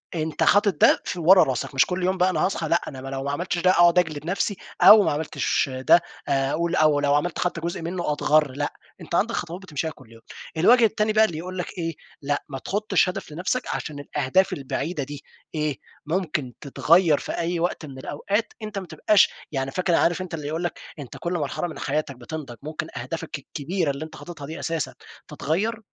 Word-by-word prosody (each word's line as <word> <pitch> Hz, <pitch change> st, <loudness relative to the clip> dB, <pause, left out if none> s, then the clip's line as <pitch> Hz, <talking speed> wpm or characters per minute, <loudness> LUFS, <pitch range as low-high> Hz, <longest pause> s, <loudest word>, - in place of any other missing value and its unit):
أنت 155 Hz, -1 st, -1 dB
حاطط 205 Hz, -5 st, +3 dB
ده -, -, +6 dB
في 180 Hz, -, -4 dB
ورا 180 Hz, +3 st, +7 dB
راسك، 130 Hz, +1 st, -3 dB
مش 130 Hz, -, +5 dB
كلّ 180 Hz, -1 st, -3 dB
يوم 185 Hz, +1 st, +1 dB
بقى 180 Hz, +1 st, +3 dB
أنا -, -, +1 dB
هاصحي 170 Hz, -4 st, -1 dB
لأ، 170 Hz, -, +3 dB
أنا 130 Hz, -2 st, -7 dB
ب -, -, -9 dB
لو 135 Hz, 0 st, -4 dB
ما 140 Hz, -, -2 dB
عملتش 175 Hz, +4 st, -2 dB
ده 185 Hz, +2 st, +4 dB
أقعد 175 Hz, 0 st, +5 dB
أجلِد 155 Hz, -3 st, -2 dB
نفسي 195 Hz, +2 st, -1 dB, 0.2 s
أو 210 Hz, -1 st, +10 dB
ما -, -, +1 dB
عملتش 145 Hz, -2 st, 0 dB
ده 130 Hz, +7 st, +5 dB, 0.3 s
أقول 140 Hz, +5 st, 0 dB
أو 155 Hz, -2 st, +4 dB
لو 145 Hz, 0 st, +2 dB
عملت 160 Hz, +3 st, -1 dB
حتى 175 Hz, -2 st, -1 dB
جزء 170 Hz, 0 st, -3 dB
منُّه 170 Hz, -1 st, -2 dB
أتغَر 150 Hz, -1 st, +3 dB
لأ، 145 Hz, +2 st, -3 dB, 0.3 s
أنت 170 Hz, -, -4 dB
عَندك 230 Hz, +5 st, +1 dB
خطوات 175 Hz, +3 st, -4 dB
بتمشِيها 160 Hz, -3 st, -3 dB
كلّ 130 Hz, -6 st, -17 dB
يوم. 115 Hz, 0 st, -15 dB, 0.4 s
الوجه 230 Hz, +7 st, +6 dB
التاني 215 Hz, 0 st, +1 dB
بقى 220 Hz, 0 st, +6 dB
اللي 160 Hz, -6 st, -4 dB
يقول 185 Hz, +3 st, -6 dB
لك 180 Hz, -, -3 dB
إيه، 165 Hz, -1 st, -2 dB, 0.3 s
لأ 145 Hz, 0 st, -1 dB
ما 135 Hz, -1 st, -5 dB
تحُطّش 205 Hz, 0 st, +1 dB
هدَف 170 Hz, -, -6 dB
لنفْسك 180 Hz, +10 st, -1 dB
عشان 145 Hz, -2 st, -5 dB
الأهداف 150 Hz, +6 st, +1 dB
البعيدة 140 Hz, +3 st, -3 dB
دي 145 Hz, +1 st, -8 dB, 0.3 s
إيه، 150 Hz, -2 st, -1 dB, 0.3 s
ممكن 155 Hz, -7 st, -2 dB
تتغيَّر 160 Hz, +2 st, +4 dB
في -, -, -5 dB
أي 170 Hz, 0 st, -1 dB
وقت 170 Hz, -2 st, -1 dB
من 135 Hz, -2 st, -10 dB
الأوقات، 200 Hz, -, -2 dB
أنت 210 Hz, -2 st, -4 dB
ما 185 Hz, -, -9 dB
تبقاش 190 Hz, +6 st, +4 dB, 0.2 s
يعني 135 Hz, -1 st, -2 dB
فاكر 180 Hz, 0 st, +1 dB
عارف 175 Hz, +2 st, +2 dB
أنت 180 Hz, -2 st, -7 dB
اللي 150 Hz, -3 st, -4 dB
يقول 160 Hz, +3 st, -3 dB
لك 175 Hz, -, -3 dB, 0.2 s
أنت 135 Hz, -, -8 dB
كلّ 175 Hz, +1 st, -3 dB
مرحلة 160 Hz, +1 st, -2 dB
من 160 Hz, -, -8 dB
حياتك 145 Hz, -1 st, -2 dB
بتنضَج 125 Hz, -1 st, -7 dB
ممكن 155 Hz, +1 st, -5 dB
أهدافك 165 Hz, -2 st, -5 dB
الكبيرة 155 Hz, +3 st, -2 dB
اللي 140 Hz, +3 st, -5 dB
أنت 160 Hz, -, -12 dB
حاططها 150 Hz, -5 st, -9 dB
دي 160 Hz, -, -7 dB
أساسًا 165 Hz, -2 st, -2 dB, 0.3 s
تتغيَّر، 215 Hz, +9 st, -1 dB
165 Hz, 210 wpm, -24 LUFS, 145-180 Hz, 0.4 s, أو